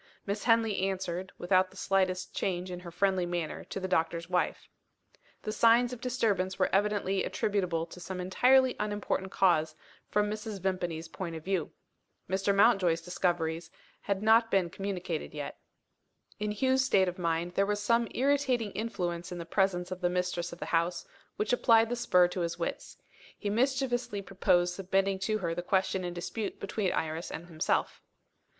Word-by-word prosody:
Miss 200 Hz, +1 st, -3 dB
Henley 225 Hz, -3 st, +3 dB
answered, 190 Hz, -1 st, -2 dB
without 185 Hz, +1 st, +2 dB
the 190 Hz, -, -17 dB
slightest 185 Hz, -1 st, 0 dB
change 180 Hz, -1 st, -2 dB
in 180 Hz, -, -5 dB
her 180 Hz, -1 st, -9 dB
friendly 185 Hz, +1 st, +1 dB
manner 175 Hz, -2 st, -3 dB
to -, -, -5 dB
the 185 Hz, -, -3 dB
doctor's 165 Hz, -1 st, 0 dB
wife. 180 Hz, 0 st, -1 dB, 0.8 s
The 215 Hz, -, -2 dB
signs 235 Hz, +3 st, +4 dB
of 240 Hz, -, -8 dB
disturbance 210 Hz, -7 st, 0 dB
were 185 Hz, -, +1 dB
evidently 195 Hz, -1 st, +1 dB
attributable 180 Hz, -5 st, -1 dB
to 170 Hz, +2 st, -12 dB
some 180 Hz, +1 st, -6 dB
entirely 255 Hz, +8 st, +4 dB
unimportant 205 Hz, -2 st, -2 dB
cause, 160 Hz, -6 st, +2 dB, 0.3 s
from 210 Hz, 0 st, +2 dB
Mrs. 215 Hz, -1 st, -5 dB
Vimpany's 175 Hz, -3 st, -2 dB
point 170 Hz, 0 st, -6 dB
of 160 Hz, -, -7 dB
view. 190 Hz, -4 st, -1 dB, 0.6 s
Mr. 190 Hz, +2 st, -1 dB
Mountjoy's 195 Hz, -5 st, +4 dB
discoveries 170 Hz, -2 st, -1 dB, 0.3 s
had 200 Hz, 0 st, -2 dB
not 225 Hz, +1 st, +5 dB
been 185 Hz, -5 st, +1 dB
communicated 185 Hz, -5 st, -4 dB
yet. 145 Hz, -1 st, -6 dB, 0.8 s
In 210 Hz, 0 st, -1 dB
Hugh's 260 Hz, +5 st, +2 dB
state 195 Hz, -7 st, +3 dB
of 180 Hz, +1 st, -4 dB
mind, 170 Hz, 0 st, -1 dB
there 195 Hz, +2 st, +2 dB
was 205 Hz, 0 st, 0 dB
some 230 Hz, +3 st, +2 dB
irritating 265 Hz, -5 st, +1 dB
influence 175 Hz, -6 st, -3 dB
in 180 Hz, -, -5 dB
the 170 Hz, -, -6 dB
presence 180 Hz, 0 st, 0 dB
of 185 Hz, 0 st, -5 dB
the 175 Hz, -, +2 dB
mistress 180 Hz, -1 st, -1 dB
of 170 Hz, -, -8 dB
the -, -, -5 dB
house, 170 Hz, +1 st, +1 dB, 0.3 s
which 215 Hz, +3 st, -1 dB
applied 230 Hz, -2 st, +5 dB
the 245 Hz, -, -1 dB
spur 180 Hz, -7 st, +4 dB
to 180 Hz, -, -4 dB
his 170 Hz, -1 st, -2 dB
wits. -, -, -4 dB, 0.4 s
He 205 Hz, -, -3 dB
mischievously 245 Hz, -3 st, 0 dB
proposed 180 Hz, -2 st, +2 dB
submitting 195 Hz, +1 st, 0 dB
to 215 Hz, +3 st, 0 dB
her 170 Hz, -5 st, -2 dB
the 175 Hz, -, -3 dB
question 190 Hz, +1 st, 0 dB
in 175 Hz, -1 st, -4 dB
dispute 205 Hz, +5 st, -4 dB
between 200 Hz, -1 st, -1 dB
Iris 160 Hz, +1 st, -2 dB
and 165 Hz, -, -6 dB
himself. 160 Hz, -2 st, -1 dB
190 Hz, 170 wpm, -30 LUFS, 175-210 Hz, 0.8 s, not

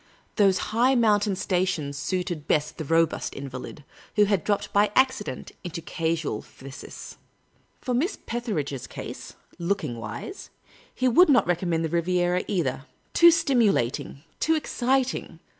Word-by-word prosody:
Those 195 Hz, -3 st, +4 dB, 0.2 s
high 250 Hz, +4 st, +4 dB
mountain 210 Hz, -4 st, +3 dB
stations 180 Hz, -6 st, -1 dB
suited 175 Hz, +1 st, -3 dB
best 150 Hz, +2 st, 0 dB
the -, -, -2 dB
robust 165 Hz, +2 st, +1 dB
invalid, 135 Hz, +1 st, -7 dB, 0.3 s
who 210 Hz, -1 st, +5 dB
had 200 Hz, -5 st, +1 dB
dropped 205 Hz, 0 st, -1 dB
by 205 Hz, +1 st, +4 dB
accident 260 Hz, -, +1 dB
into 175 Hz, -1 st, -5 dB
casual 165 Hz, -7 st, -2 dB
phthisis. 135 Hz, 0 st, -11 dB, 0.6 s
For 250 Hz, -, -2 dB
Miss 320 Hz, -, 0 dB
Petheridge's 190 Hz, -, -3 dB
case -, -, -8 dB
— -, -, -40 dB
looking 170 Hz, -8 st, -1 dB
wise 115 Hz, -, -7 dB, 0.2 s
— -, -, -27 dB
he 255 Hz, -, +1 dB
would 315 Hz, +8 st, +6 dB
not 250 Hz, -7 st, +5 dB
reconnnend 175 Hz, -1 st, 0 dB
the 160 Hz, -, -1 dB
Riviera, 175 Hz, +2 st, +1 dB
either; 140 Hz, -8 st, -1 dB, 0.3 s
too 340 Hz, -, +8 dB
stimulating, 215 Hz, -, +1 dB, 0.2 s
too 320 Hz, -, +2 dB
exciting. 265 Hz, -3 st, -1 dB
185 Hz, 140 wpm, -26 LUFS, 155-235 Hz, 0.6 s, too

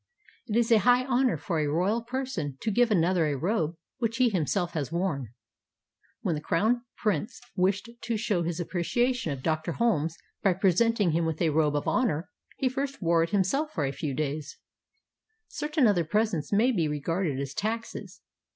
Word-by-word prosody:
It 220 Hz, -1 st, 0 dB
is 235 Hz, 0 st, +2 dB
a 225 Hz, -, +7 dB
high 245 Hz, +5 st, +4 dB
honor 255 Hz, -1 st, +2 dB
for 170 Hz, -5 st, -2 dB
a 150 Hz, -, +1 dB
royal 185 Hz, +10 st, +1 dB
person 230 Hz, -, -4 dB
to 220 Hz, -, 0 dB
give 240 Hz, +3 st, +3 dB
another 175 Hz, -4 st, +3 dB
a 145 Hz, -2 st, -1 dB
robe 170 Hz, -, 0 dB, 0.2 s
which 230 Hz, -1 st, -1 dB
he 255 Hz, -2 st, +4 dB
himself 175 Hz, -1 st, 0 dB
has 150 Hz, -2 st, -3 dB
worn. 170 Hz, -7 st, -1 dB, 0.9 s
When -, -, 0 dB
the 150 Hz, -, -3 dB
crown 235 Hz, +10 st, +1 dB
prince 210 Hz, -1 st, -1 dB, 0.2 s
wished 195 Hz, +4 st, +1 dB, 0.2 s
to 230 Hz, -1 st, 0 dB
show 205 Hz, -5 st, 0 dB
his 170 Hz, 0 st, -2 dB
appreciation 190 Hz, -, 0 dB
of 135 Hz, -2 st, -5 dB
Dr. 160 Hz, +1 st, -1 dB
Holmes 165 Hz, -8 st, +1 dB, 0.2 s
by 195 Hz, -, +3 dB
presenting 195 Hz, +2 st, +2 dB
him 165 Hz, +1 st, +1 dB
with 160 Hz, -1 st, -3 dB
a 165 Hz, -3 st, +2 dB
robe 150 Hz, -1 st, +2 dB
of 145 Hz, -, -1 dB
honor, 175 Hz, -10 st, +1 dB, 0.3 s
he 265 Hz, -, +1 dB
first 275 Hz, +2 st, -3 dB
wore 170 Hz, -2 st, +3 dB
it 165 Hz, -, 0 dB
himself 210 Hz, -, 0 dB
a 140 Hz, -3 st, +1 dB
few 140 Hz, 0 st, -4 dB
days. 150 Hz, 0 st, -3 dB, 0.9 s
Certain 300 Hz, -2 st, 0 dB
other 200 Hz, -6 st, +3 dB
presents 210 Hz, -2 st, 0 dB
maybe 210 Hz, -5 st, +3 dB
regarded 150 Hz, 0 st, -1 dB
as 140 Hz, 0 st, -4 dB
taxes. 225 Hz, +6 st, -4 dB
185 Hz, 175 wpm, -28 LUFS, 160-230 Hz, 0.9 s, a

